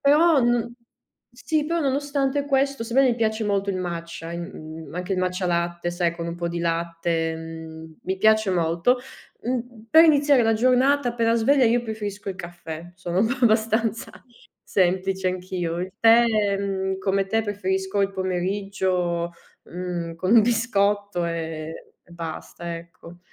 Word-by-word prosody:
Però 300 +2 +5
n 240 -1 +1 0.6
sì 295 +5 -1
però 335 +1 0
nonostante 280 0 0
questo, 275 -2 +1
sebbene 255 +3 +3
mi 235 - -1
piace 220 -1 0
molto 200 -1 0
il 195 - 0
matcha 170 -2 -5
a - - -6
in 170 +2 -5
mhmm, 160 -1 -10
anche 180 +2 -3
il 185 - 0
matcha 185 0 -1
latte, 175 0 -1
sai, 175 -1 0
con 170 0 -5
un 170 - -4
po' 170 0 -2
di 170 0 -3
latte, 165 -1 -1
mhmm, 160 0 -9
mi 190 +1 -1
piace 220 +1 +4
molto. 170 +7 +2 0.5
Mhmm, 240 -2 -4
per 320 +1 +8
iniziare 290 -4 +5
la 225 0 +3
giornata 255 +3 +3
appena 230 -1 +1
sveglia 255 +3 +4
io 235 +1 +2
preferisco 210 -3 -5
il 190 - -7
caffè. 175 -1 -8
Sono 175 0 -3 0.2
abbastanza 225 0 +2 0.5
semplice 190 0 +1
anch'io. 180 -2 -3
Il 185 +1 -5
tè, 230 +1 +7 0.3
mhmm, 190 -1 -2
come 195 0 0
te 225 +3 +1
preferisco 190 -1 -1
il 195 0 +2
pomeriggio, 185 -2 -1 0.3
mhmm, 175 -2 -5
con 185 +4 -1
un 230 - +9
biscotto, 205 -4 +1
ehm, 160 -2 -4 0.4
e - - -21
basta, 170 0 -6
ecco. 170 +1 -13
190 Hz, 155 wpm, -24 LUFS, 170-230 Hz, 0.6 s, un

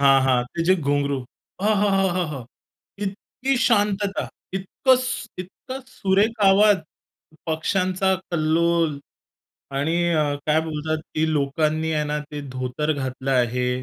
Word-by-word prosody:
हां, 135 -1 +6
हां 130 -1 +4 0.2
ते 165 - 0
जे 185 - +7
घुंगरू 140 -2 0 0.5
आहाहाहा! 190 - +1 0.6
इतकी 250 +7 -2
शांतता, 205 -2 +1 0.2
इतकं 195 +7 +2
सू 255 - -3
इतकं 260 +8 -9
सुरेख 210 -1 +1
आवाज, 200 +1 +6 0.7
पक्षांचा 185 +4 +1 0.2
कल्लोल 165 -1 +1 0.8
आणि 160 +4 +1 0.2
अ, 150 -2 +1
काय 155 +1 +3
बोलतात, 155 0 -2 0.2
की 160 0 +1
लोकांनी 155 +2 0
आहे 150 -1 0
ना 150 0 -1
ते 150 -1 -5
धोतर 130 +4 -1
घातलं 130 -1 -3
आहे. 125 -1 +1
160 Hz, 115 wpm, -23 LUFS, 145-195 Hz, 0.8 s, जे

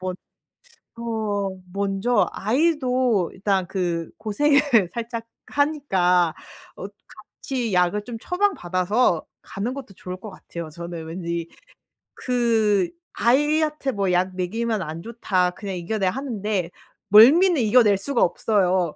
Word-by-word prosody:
뭐 185 0 -3 0.9
어 210 -4 -2 0.2
먼저 200 +3 +1
아이도 250 - +1
일단 190 -2 -1
그 175 -4 -2
고생을 280 +8 +2 0.3
살짝 230 -1 -5 0.2
하니까 190 - +1 0.4
어 195 - -6 0.2
같이 235 +2 -6
약을 180 +3 +2
좀 230 +1 -7
처방 395 - +1
받아서 185 +1 +1 0.2
가는 225 +6 -4
것도 260 -8 -9
좋을 180 0 -7
것 215 +1 -9
같아요 170 -3 -8
저는 170 0 -7
왠지. 170 0 -4 0.7
그 225 -6 +1 0.2
아이한테 295 +4 +1
뭐 200 -5 -1
"약 185 +1 0
먹이면 220 +3 -1
안 160 0 -5
좋다. 190 -5 0
그냥 195 +1 -6
이겨내." 190 +3 -2
하는데 210 -6 -2 0.4
멀미는 295 - +7
이겨낼 215 -2 +4
수가 250 +5 -1
없어요. 185 -3 +1
205 Hz, 235 characters per minute, -23 LUFS, 180-245 Hz, 0.9 s, 멀미는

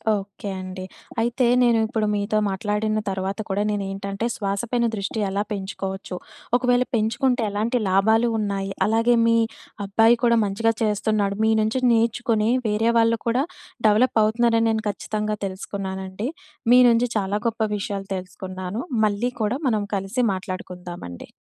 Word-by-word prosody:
Okay 200 0 -6
అండి. 185 0 -7 0.4
అయితే 240 +2 +1 0.2
నేను 235 -1 +4
ఇప్పుడు 220 -2 -1
మీతో 205 +1 0
మాట్లాడిన 210 +2 -1
తర్వాత 190 +2 -3
కూడా 195 +2 0
నేను 205 -1 -1
ఏంటంటే, 195 +2 -4
శ్వాస 200 -1 -2
పైన 240 -1 +2
దృష్టి 205 +2 -3
ఎలా 200 +2 -1
పెంచుకోవచ్చు. 195 -1 -4 0.4
ఒకవేళ 250 0 +2
పెంచుకుంటే 240 +3 +1
ఎలాంటి 220 +5 0
లాభాలు 220 +5 +3
ఉన్నాయి. 195 -2 -2
అలాగే 230 +2 +3
మీ 230 0 +4 0.5
అబ్బాయి 225 +4 +4
కూడా 235 -1 +4
మంచిగా 225 +3 +1
చేస్తున్నాడు. 210 -1 0
మీ 220 - +4
నుంచి 220 +4 0
నేర్చుకొని, 230 -1 +2 0.2
వేరే 215 +2 +1
వాళ్ళు 230 0 +3
కూడా 245 +4 +2 0.4
డెవలప్ 225 +3 +3
అవుతున్నారని, 230 +1 +2
నేను 220 0 0
ఖచ్చితంగా 210 +1 -3
తెలుసుకున్నానండి. 190 +1 -5 0.4
మీ 250 - +8
నుంచి 235 +1 +3
చాలా 200 -1 0
గొప్ప 225 0 -3 0.2
విషయాలు 200 -2 -4
తెలుసుకున్నాను. 185 +2 -6 0.3
మళ్ళీ 210 +4 0
కూడా 215 +4 +1
మనం 215 -4 +1
కలిసి 195 +6 -1
మాట్లాడుకుందామండి. 180 - -7
210 Hz, 135 wpm, -23 LUFS, 195-230 Hz, 0.5 s, మీ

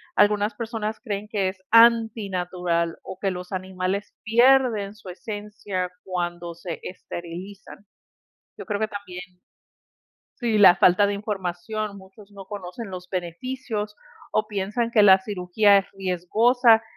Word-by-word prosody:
algunas 205 +1 +3
personas 220 -2 -4
creen 210 -3 -4
que 200 -3 0
es 185 0 -10
antinatural 190 -7 +3
o 185 - -8
que 195 -1 +1
los 180 +1 -7
animales 185 +1 -3
pierden 235 -3 +3
su 200 - -12
esencia 205 -1 -5 0.2
cuando 175 -2 -4
se 170 -1 -6
esterilizan. 185 +3 -9 0.7
Yo - - -7
creo 205 -2 -2
que 220 - 0
también 200 -3 -7 1.2
Si 235 -4 0
la 185 -3 +9
falta 185 +3 +5
de 205 - -1
información, 200 +1 -4
muchos 195 +2 -16
no 195 -1 -11
conocen 200 +2 -7
los 180 -1 -7
beneficios 210 +4 -4 0.4
o 215 0 0
piensan 210 +3 -2
que 215 -3 +5
la 190 -1 +8
cirugía 200 +1 +3
es 195 - 0
riesgosa 220 +6 +3
200 Hz, 130 wpm, -24 LUFS, 185-215 Hz, 1.2 s, la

